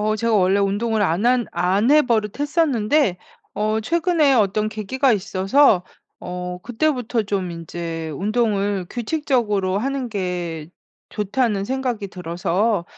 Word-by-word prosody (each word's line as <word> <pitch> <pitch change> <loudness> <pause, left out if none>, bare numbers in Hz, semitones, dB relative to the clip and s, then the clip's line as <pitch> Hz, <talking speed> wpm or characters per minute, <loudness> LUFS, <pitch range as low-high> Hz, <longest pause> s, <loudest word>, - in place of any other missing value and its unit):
어 215 +1 +1
제가 230 +1 0
원래 190 -1 +3
운동을 210 +2 0
안 190 +4 +1
한 250 -1 +3
안 195 +7 +1
해 300 +1 +6
버릇했었는데 245 - +1 0.4
어 215 +1 0
최근에 320 - +2
어떤 215 -2 +2
계기가 235 +5 0
있어서 195 +2 +3 0.4
어 180 0 -5
그때부터 245 -2 0
좀 195 -3 -2
인제 165 -1 -5
'운동을 200 - 0
규칙적으로 235 -8 0
하는 270 +1 -2
게 175 -6 -4 0.4
좋다.'는 210 -1 -1
생각이 250 -3 -2
들어서 180 +3 -1
210 Hz, 270 characters per minute, -21 LUFS, 185-245 Hz, 0.4 s, 해